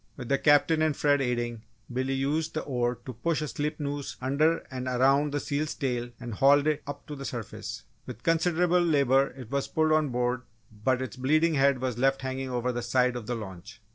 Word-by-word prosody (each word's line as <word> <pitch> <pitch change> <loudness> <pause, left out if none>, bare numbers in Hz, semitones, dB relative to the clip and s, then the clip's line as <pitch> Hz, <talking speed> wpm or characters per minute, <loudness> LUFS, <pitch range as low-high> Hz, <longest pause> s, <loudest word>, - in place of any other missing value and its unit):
With 125 -3 -7
the 140 - +2
Captain 155 +2 +4
and 155 -2 +1
Fred 145 -1 +3
aiding, 120 -3 -2 0.3
Billy 130 +2 -1
used 155 +4 -1
the 155 - -1
oar 125 -2 -1
to 130 - -6
push 160 +8 -1
a - - -3
slip 150 +2 -3
noose 145 -1 -4
under 150 +5 +1
and 130 0 -4
around 135 +3 +3
the 145 - -1
seal's 145 +2 -2
tail 125 -3 -2
and 120 -2 -6
hauled 140 +6 +5
it 155 -1 +1
up 145 0 -7
to 150 - -7
the 135 - -7
surface. 120 -5 -6 0.2
With 120 -3 -8
considerable 175 +2 +2
labour 140 -5 +3
it 125 -3 -10
was 140 -1 -1
pulled 155 0 +1
on 155 -2 +3
board 125 0 0 0.3
but 125 +4 0
its 130 - -7
bleeding 155 +6 +2
head 140 -2 +3
was 125 -2 -2
left 135 +1 +2
hanging 130 0 -3
over 125 0 -1
the 120 0 -3
side 125 +1 +1
of 120 -3 -6
the 120 - -1
launch. 105 +1 -9
135 Hz, 210 wpm, -28 LUFS, 125-150 Hz, 0.3 s, hauled